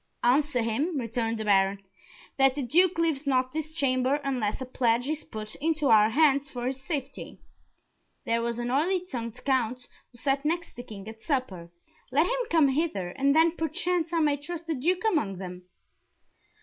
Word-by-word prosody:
"Answer 255 Hz, 0 st, +2 dB
him," 285 Hz, +9 st, -1 dB
returned 230 Hz, -1 st, -2 dB
the 220 Hz, -, -4 dB
Baron, 195 Hz, -1 st, +3 dB, 0.6 s
"that 270 Hz, -1 st, +5 dB
the 285 Hz, -, -2 dB
Duke 340 Hz, +8 st, +3 dB
leaves 315 Hz, -4 st, 0 dB
not 255 Hz, -1 st, +1 dB
this 310 Hz, 0 st, -4 dB
chamber 260 Hz, -2 st, +2 dB
unless 250 Hz, -7 st, -1 dB
a 260 Hz, -, -4 dB
pledge 245 Hz, -1 st, +1 dB
is 305 Hz, 0 st, -2 dB
put 215 Hz, -1 st, -7 dB
into 310 Hz, -1 st, 0 dB
our 215 Hz, -1 st, +6 dB
hands 280 Hz, +1 st, +3 dB
for 245 Hz, -1 st, -5 dB
his 265 Hz, +1 st, -3 dB
safety. 275 Hz, -1 st, -5 dB, 0.9 s
There 230 Hz, 0 st, +1 dB
was 235 Hz, 0 st, -2 dB
an 240 Hz, 0 st, -2 dB
oily 350 Hz, +7 st, +1 dB
tongued 230 Hz, -9 st, -6 dB
Count, 250 Hz, -2 st, 0 dB, 0.2 s
who 240 Hz, -, -15 dB
sat 275 Hz, +2 st, 0 dB
next 335 Hz, +2 st, -2 dB
the 245 Hz, -, -6 dB
King 210 Hz, -4 st, -10 dB
at 220 Hz, 0 st, -10 dB
supper 225 Hz, -, -2 dB, 0.4 s
let 295 Hz, +5 st, +4 dB
him -, -, -2 dB
come 320 Hz, -4 st, +4 dB
hither, 265 Hz, -, -1 dB
and 275 Hz, +9 st, +1 dB
then 325 Hz, +1 st, +4 dB
perchance 335 Hz, +1 st, -1 dB
I 335 Hz, -1 st, +1 dB
may 295 Hz, -2 st, +2 dB
trust 335 Hz, +3 st, -7 dB
the 325 Hz, -, -1 dB
Duke 345 Hz, +7 st, 0 dB
among 260 Hz, -, 0 dB
them." 180 Hz, -1 st, -8 dB
270 Hz, 180 wpm, -27 LUFS, 230-315 Hz, 0.9 s, our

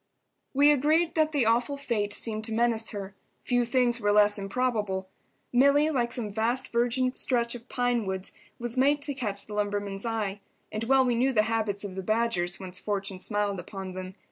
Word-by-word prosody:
We 290 Hz, +2 st, +6 dB
agreed 310 Hz, +4 st, +2 dB
that 310 Hz, -1 st, +2 dB
the 285 Hz, -6 st, +2 dB
awful 240 Hz, +5 st, +1 dB
fate 225 Hz, -7 st, -2 dB
seemed 215 Hz, 0 st, 0 dB
to 225 Hz, -, -2 dB
menace 225 Hz, -1 st, +1 dB
her. 195 Hz, -2 st, -6 dB, 0.3 s
Few 245 Hz, -1 st, +2 dB
things 240 Hz, 0 st, +2 dB
were 205 Hz, 0 st, +2 dB
less 205 Hz, 0 st, +4 dB
improbable. 205 Hz, -3 st, -1 dB, 0.5 s
Milly, 280 Hz, +4 st, +4 dB
like 240 Hz, -5 st, 0 dB
some 215 Hz, -5 st, -1 dB
vast 235 Hz, +4 st, 0 dB
virgin 245 Hz, +2 st, +1 dB
stretch 235 Hz, -2 st, 0 dB
of 245 Hz, 0 st, -10 dB
pine 245 Hz, -4 st, 0 dB
woods, 190 Hz, 0 st, -3 dB, 0.3 s
was 240 Hz, +1 st, -6 dB
made 285 Hz, +2 st, +3 dB
to 285 Hz, -, -2 dB
catch 225 Hz, -7 st, -2 dB
the 210 Hz, -, -9 dB
lumberman's 205 Hz, -1 st, -2 dB
eye. 215 Hz, -4 st, -2 dB, 0.3 s
And 215 Hz, +1 st, -3 dB
well 265 Hz, +1 st, +4 dB
we 245 Hz, -, +2 dB
knew 255 Hz, +3 st, +2 dB
the 215 Hz, -3 st, +4 dB
habits 215 Hz, -2 st, -1 dB
of 200 Hz, -2 st, -5 dB
the 190 Hz, -, -4 dB
Badgers, 205 Hz, -4 st, 0 dB
once 185 Hz, -1 st, -5 dB
fortune 200 Hz, -2 st, -3 dB
smiled 205 Hz, -1 st, -1 dB
upon 190 Hz, +1 st, -7 dB
them. 185 Hz, 0 st, -6 dB
225 Hz, 190 wpm, -27 LUFS, 205-250 Hz, 0.5 s, We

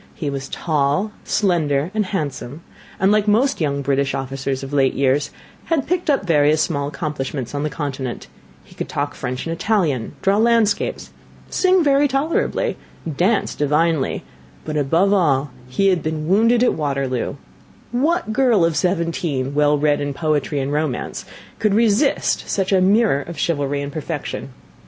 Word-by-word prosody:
He 145 Hz, -4 st, -3 dB
was 135 Hz, -1 st, -5 dB
tall, 155 Hz, +5 st, 0 dB
slender, 165 Hz, -6 st, +1 dB
and 215 Hz, -3 st, 0 dB
handsome, 150 Hz, -4 st, -4 dB, 0.4 s
and 190 Hz, +2 st, +3 dB
like 210 Hz, 0 st, +2 dB
most 235 Hz, +3 st, +2 dB
young 140 Hz, -2 st, 0 dB
British 140 Hz, 0 st, 0 dB
officers 135 Hz, 0 st, -3 dB
of 135 Hz, +1 st, -7 dB
late 135 Hz, -2 st, +2 dB
years, 140 Hz, +1 st, +1 dB, 0.4 s
had 320 Hz, -5 st, 0 dB
picked 355 Hz, -2 st, -1 dB
up 275 Hz, -8 st, +2 dB
various 150 Hz, -2 st, +3 dB
small 140 Hz, -3 st, 0 dB
accomplishments 140 Hz, -3 st, -4 dB
on 145 Hz, -, -2 dB
the 150 Hz, -, -1 dB
Continent 135 Hz, -4 st, -4 dB, 0.4 s
he -, -, -18 dB
could -, -, -5 dB
talk 145 Hz, 0 st, -2 dB
French 125 Hz, 0 st, -4 dB
and 165 Hz, -, -2 dB
Italian 165 Hz, -, 0 dB
draw 195 Hz, +1 st, +3 dB
landscapes, 225 Hz, -2 st, +1 dB, 0.4 s
sing 370 Hz, -2 st, +3 dB
very 285 Hz, 0 st, +4 dB
tolerably 280 Hz, +4 st, 0 dB, 0.4 s
dance 195 Hz, +8 st, +1 dB
divinely; 150 Hz, 0 st, +1 dB, 0.4 s
but 155 Hz, -, -4 dB
above 165 Hz, +7 st, +2 dB
all 145 Hz, -8 st, +2 dB, 0.2 s
he 195 Hz, +10 st, +2 dB
had 180 Hz, -3 st, +2 dB
been 155 Hz, 0 st, -3 dB
wounded 230 Hz, +6 st, +4 dB
at 250 Hz, -, +3 dB
Waterloo; 140 Hz, -4 st, -2 dB, 0.6 s
what 295 Hz, +1 st, 0 dB
girl 235 Hz, -8 st, +3 dB
of 165 Hz, -2 st, 0 dB
seventeen, 165 Hz, -7 st, -1 dB
well 150 Hz, 0 st, +3 dB
read 145 Hz, 0 st, +2 dB
in 145 Hz, -1 st, -3 dB
poetry 150 Hz, -1 st, 0 dB
and 135 Hz, +1 st, -2 dB
romance, 150 Hz, -4 st, -2 dB, 0.3 s
could 210 Hz, -2 st, +2 dB
resist 230 Hz, +5 st, +2 dB
such 195 Hz, -1 st, 0 dB
a 190 Hz, -1 st, +4 dB
mirror 200 Hz, -6 st, +3 dB
of 170 Hz, +2 st, -8 dB
chivalry 145 Hz, -3 st, -1 dB
and 140 Hz, -, -5 dB
perfection! 155 Hz, -3 st, -4 dB
155 Hz, 155 wpm, -20 LUFS, 140-205 Hz, 0.6 s, very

